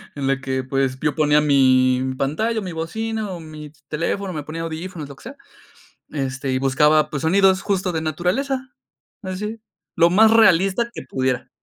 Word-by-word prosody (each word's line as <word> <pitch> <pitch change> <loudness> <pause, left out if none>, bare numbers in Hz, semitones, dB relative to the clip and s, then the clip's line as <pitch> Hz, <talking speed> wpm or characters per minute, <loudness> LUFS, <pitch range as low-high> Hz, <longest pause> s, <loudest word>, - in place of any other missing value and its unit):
en 140 -2 -3
la 135 0 +1
que, 130 -1 -3
pues, 130 0 -1
yo 150 -2 0
ponía 150 -1 +3
mi 130 -2 +3
pantalla, 215 - -1
mi 185 -3 -5
bocina 215 +6 -4
o 180 - -6
mi 155 -2 -10 0.2
teléfono, 185 +5 -2
me 150 -2 -5
ponía 155 +3 -6
audífonos, 165 -1 -6
lo 140 - -10
que - - -18
sea. 260 +4 -9 0.7
Este, 135 -2 -3
y 130 - 0
buscaba, 150 +3 +3
pues, 145 -3 -4
sonidos 190 +3 +4
justo 190 -2 0
de 160 -2 -2
naturaleza. 255 - -2 0.5
Así, 210 +4 -5 0.4
lo 170 0 +5
más 220 +4 +6
realista 200 +1 +4
que - - -7
pudiera. 130 -1 -2
160 Hz, 170 wpm, -21 LUFS, 135-190 Hz, 0.7 s, más